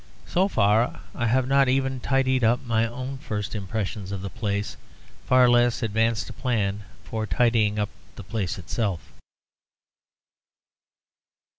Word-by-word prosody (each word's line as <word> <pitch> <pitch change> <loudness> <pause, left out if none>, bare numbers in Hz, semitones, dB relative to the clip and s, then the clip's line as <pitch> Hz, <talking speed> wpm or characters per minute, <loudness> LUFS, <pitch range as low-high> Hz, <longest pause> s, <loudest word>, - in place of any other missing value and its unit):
So 185 +2 +2
far 110 - +2
I 120 - -1
have 130 +2 +2
not 135 -1 +4
even 135 0 +1
tidied 130 -1 +1
up 120 +4 +2
my 115 -1 +1
own 130 +3 -6
first 105 -7 -4
impressions 100 -1 -4
of 100 -1 -4
the 100 - -5
place; 105 -2 -2 0.5
far 130 -1 +6
less 120 0 +3
advanced 115 0 +1
a - - -9
plan 105 -5 -1 0.2
for 110 -1 -4
tidying 115 -3 +2
up 105 -1 0 0.3
the - - -9
place 95 -2 -3
itself. 90 -2 -3
115 Hz, 135 wpm, -25 LUFS, 105-125 Hz, 0.5 s, far